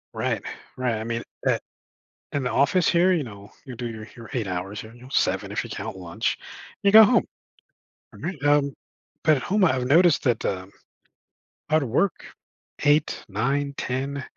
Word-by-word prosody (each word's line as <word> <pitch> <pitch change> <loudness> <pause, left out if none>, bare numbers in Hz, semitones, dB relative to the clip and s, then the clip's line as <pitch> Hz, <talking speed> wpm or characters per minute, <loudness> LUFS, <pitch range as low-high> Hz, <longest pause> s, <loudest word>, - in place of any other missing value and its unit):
Right, - - -1 0.4
right. 125 -3 0
I 110 - -4
mean, 115 0 -3 0.2
at - - +2 0.7
in 140 -2 -2
the 125 - 0
office 145 +6 +3
here, 180 +2 +4
you 160 -6 +1
know, 100 -2 -11
you 130 -3 -8
do 120 0 -4
your 110 -1 -8
your 115 -2 -11
8 115 -6 -1
hours, 95 +3 -4
you 110 - -12
know, 125 +2 -14
7 - - +1
if - - -2
you - - -9
count - - -5
lunch, 85 -2 -2 0.5
you 200 - +5
go 220 0 +11
home. 220 +4 +5 0.9
Alright? 165 -6 -6
Um, 145 -1 +3 0.5
but 155 -1 +5
at - - -4
home, 200 0 +3
I've 130 -5 +1
noticed 165 +2 +5
that, 120 -3 +1
um, 95 0 -3 1.0
I'd 155 -1 +4
work, 145 - 0 0.6
8, 145 +1 +2
9, 140 +7 0
10, 135 +2 -2
130 Hz, 170 wpm, -25 LUFS, 115-150 Hz, 1.0 s, go